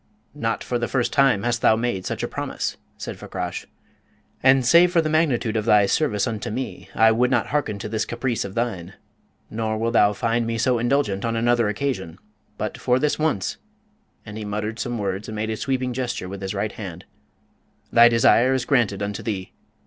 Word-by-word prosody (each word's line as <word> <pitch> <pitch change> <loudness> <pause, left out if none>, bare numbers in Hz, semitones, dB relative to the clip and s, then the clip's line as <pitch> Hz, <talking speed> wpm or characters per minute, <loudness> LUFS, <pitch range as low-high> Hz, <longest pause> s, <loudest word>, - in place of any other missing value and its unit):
"Not 115 -6 -2
for 120 - -2
the 120 - -1
first 125 -3 -1
time 135 -7 +3
hast 120 0 0
thou 110 - +5
made 115 -5 -2
such - - -3
a - - 0
promise," - - -4 0.2
said - - -7
Fakrash. 90 -1 -5 0.7
"And 130 -1 +5
save 170 +6 +6
for 175 - +3
the 155 -1 +1
magnitude 135 -8 +1
of 110 -1 0
thy 105 -3 +5
service 105 -2 +1
unto 110 -4 -3
me, 130 +5 -5
I 110 0 +5
would 125 +3 +2
not 130 - +2
hearken 135 -8 -1
to 100 - -6
this 110 0 -1
caprice 120 -1 -2
of 100 -1 -8
thine, 95 -7 -3 0.6
nor 110 0 -2
wilt 115 +2 -1
thou 105 -3 +5
find 115 +2 0
me 115 0 -2
so 125 +1 +2
indulgent 120 -5 0
on 115 0 -1
another 120 0 +2
occasion. 105 -7 -3 0.4
But 105 - -4
for 125 0 +2
this 150 +3 0
once" 155 -12 -1 0.7
and 105 +1 -7
he - - -5
muttered 105 +2 -4
some 120 -1 -2
words 100 0 -3
and 110 - -6
made 110 +1 -2
a - - -1
sweeping 130 +1 -2
gesture 125 -6 -3
with 100 +1 -7
his 95 +1 -4
right 105 +1 -1
hand 95 -3 -8 0.9
"thy 120 0 +8
desire 120 +2 +4
is 130 -1 -1
granted 105 -8 +1
unto 100 0 -4
thee. 95 -5 -4
115 Hz, 200 wpm, -23 LUFS, 105-125 Hz, 0.9 s, thy